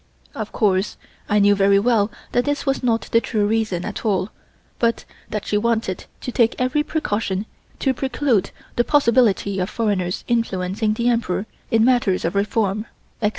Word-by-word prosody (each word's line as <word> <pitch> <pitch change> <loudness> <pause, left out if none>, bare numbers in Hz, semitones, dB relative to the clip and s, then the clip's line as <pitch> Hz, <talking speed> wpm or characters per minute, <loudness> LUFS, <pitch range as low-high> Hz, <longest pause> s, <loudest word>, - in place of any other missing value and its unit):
Of - - -5
course 195 -3 +1 0.3
I 210 - +3
knew 205 0 +5
very 200 0 +4
well 215 -1 +2 0.2
that 245 - +2
this 290 0 -1
was 270 -1 0
not 230 -3 +1
the 230 - +4
true 215 -4 0
reason 210 -5 0
at - - -5
all 195 -3 0 0.5
but 230 -1 +1 0.2
that 210 - -3
she 210 - +1
wanted 225 -4 -1 0.2
to 250 - -4
take 230 -2 +2
every 255 +4 +1
precaution 210 -10 -2 0.3
to 265 - +1
preclude 255 -5 0 0.3
the 240 - +4
possibility 235 -8 +3
of 180 +2 -1
foreigners 200 -6 -1
influencing 215 -2 0
the 235 +2 0
Emperor 230 -4 0 0.2
in 225 0 +4
matters 240 -9 +2
of 170 - 0
reform, 205 +1 0 0.3
etc. 210 - +3
220 Hz, 165 wpm, -21 LUFS, 200-240 Hz, 0.5 s, knew